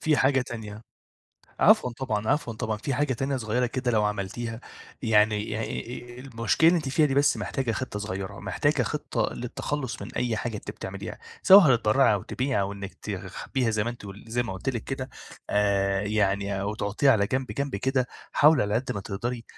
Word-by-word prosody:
في 155 -2 +2
حاجة 135 0 +3
تانية. 110 -4 -7 0.8
عفوًا 125 - +5
طبعًا، 110 -4 -2
عفوًا 135 -4 +1
طبعًا. 110 0 -2
في 130 +5 -3
حاجة 145 0 +1
تانية 135 +3 -1
صغيرة 120 +1 0
كده 125 0 -1
لو 105 -2 +2
عملتيها 105 +3 -3 0.4
يعني 105 -2 +3
يعني 115 +2 -4 0.2
آآ - - -8
المشكلة 130 +4 +2
اللي 175 - +5
أنتِ 145 -4 -4
فيها 150 +3 +3
دي 135 - -1
بس 140 +1 +4
محتاجة 130 -4 -2
خطة 125 -3 -4
صغيرة، 100 0 -5
محتاجة 100 +10 +1
خطة 150 - -1
للتخلُّص 130 +2 -4
من - - -9
أي 120 -3 0
حاجة 110 0 -3
أنتِ - - -7
بتعمليها، 95 +2 -7 0.2
سواء 185 -9 +8
هتتبرّعي 115 +2 +4
أو 100 - -2
تبيعي 130 0 -1
أو 100 0 -1
إنِّك 100 -1 -7
تخبّيها 125 -4 -3
زي 110 -1 0
ما 120 - -1
أنتِ 120 -4 -10
قل 100 +2 -10
زي 120 +2 0
ما 115 - -5
قُلت 95 +7 -5
لِك 120 -4 -2
كده 135 -1 -4 0.4
آآ، 100 -1 +2
يعني 100 -1 0
أو 100 +2 -2
تحُطّيها 110 +6 +2
على 100 -2 +2
جنب 130 +3 -1
جنب 140 -6 -2
كده. 130 +3 0 0.3
حاولي 150 -3 +5
على 105 +1 -1
قد 125 +3 -1
ما 100 - -4
تقدري 115 +5 -4
115 Hz, 195 wpm, -26 LUFS, 105-130 Hz, 0.8 s, سواء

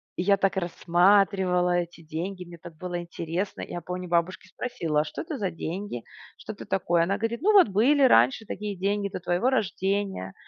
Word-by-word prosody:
И 180 - -1
я 200 +1 +4
так 195 0 +1
рассматривала 180 +1 +3
эти 170 -1 -4
деньги, 175 +4 -5
мне 170 0 -11
так 165 0 -12
было 180 0 -4
интересно. 170 +3 -4
Я 175 - -6
помню, 180 +2 -5
у - - -12
бабушки 175 +1 0
спросила: 165 -9 -2
"А - - -1
что - - -6
это 315 -4 -5
за 195 -3 -2
деньги? 165 - -5 0.3
Что 215 - -8
это - - -10
такое?" 175 -3 +1
Она 195 +4 0
говорит: 225 +4 -3
"Ну 425 +3 +3
вот 380 - +7
были 265 +9 +3
раньше 130 - +4
такие 205 -1 -5
деньги 200 +1 -1
до - - -5
твоего 175 +8 +1
рождения. 195 - -1
185 Hz, 195 wpm, -26 LUFS, 175-205 Hz, 0.3 s, вот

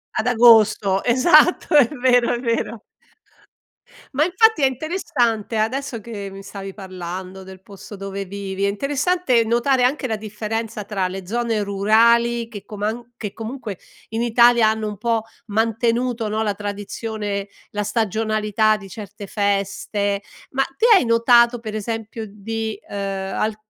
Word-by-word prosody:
Ad 220 +3 0
agosto, 220 -5 +5
esatto, 300 +7 +4
è 280 -6 +7
vero, 245 -3 +2
è - - -4
vero. 230 -2 -2 1.3
Ma 300 - +3
infatti 380 +1 +3
è 270 - +5
interessante, 255 - -1
adesso 235 +2 -2
che 205 -2 -7
mi 195 0 -10
stavi 195 -1 -8
parlando 185 -1 -7
del 190 0 -12
posto 200 +1 -11
dove 195 0 -5
vivi, 195 0 -5
è - - +3
interessante 275 - +1
notare 240 +3 +1
anche 260 +2 +1
la 220 -3 -1
differenza 215 0 -4
tra 195 -2 -2
le 190 0 -7
zone 225 +1 -1
rurali 230 +4 +3
che 210 -4 -9
coman 220 +4 -5
che 210 -4 -6
comunque 225 -3 -6 0.3
in 225 +1 -2
Italia 235 -1 +5
hanno 220 0 -2
un 210 - -6
po' 230 -1 0 0.2
mantenuto, 230 +2 0
no, 215 +1 -1
la 210 -2 0
tradizione, 205 0 -4 0.2
la 210 - -2
stagionalità 215 0 +1
di 195 - -11
certe 205 +1 -9
feste, 200 0 -1 0.3
ma 270 - 0 0.2
te - - +2
hai 365 - +4
notato, 235 +1 +4
per 220 -2 -7
esempio, 225 +1 -4
di, 220 +1 -5
ehm, 195 -1 -4
al 215 0 0
220 Hz, 145 wpm, -21 LUFS, 200-235 Hz, 1.3 s, è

